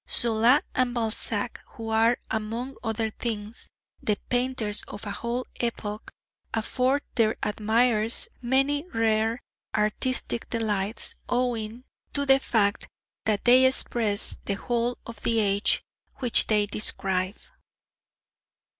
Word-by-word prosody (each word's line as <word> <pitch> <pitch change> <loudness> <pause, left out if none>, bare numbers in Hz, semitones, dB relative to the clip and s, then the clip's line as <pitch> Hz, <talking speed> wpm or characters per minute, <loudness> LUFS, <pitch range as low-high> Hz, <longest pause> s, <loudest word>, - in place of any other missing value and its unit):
Zola 235 +3 +4
and 250 -1 +1
Balzac, 225 -2 -1
who 225 -2 -6
are, 225 +2 +3
among 225 +5 -3
other 225 -1 -1
things, 215 -1 -5 0.3
the 210 -1 0
painters 245 -4 0
of 205 - -8
a 205 - -4
whole 235 +4 -3
epoch, 220 -3 -4 0.5
afford 255 +5 +1
their 220 -2 +2
admirers 220 +1 +2
many 270 +4 +1
rare 225 +1 +1 0.3
artistic 225 +3 -1
delights 215 -2 -1 0.2
owing 240 -1 -1 0.3
to 285 0 0
the 270 0 +6
fact 205 -6 +1 0.4
that 215 -2 0
they 250 +2 +7
express 235 -5 +4
the 200 - -1
whole 240 +3 -1
of 230 -2 -9
the 230 - +1
age 200 -1 +2 0.3
which 245 -3 +1
they 210 -1 +3
describe. 190 -2 -1
225 Hz, 115 wpm, -26 LUFS, 215-245 Hz, 0.5 s, they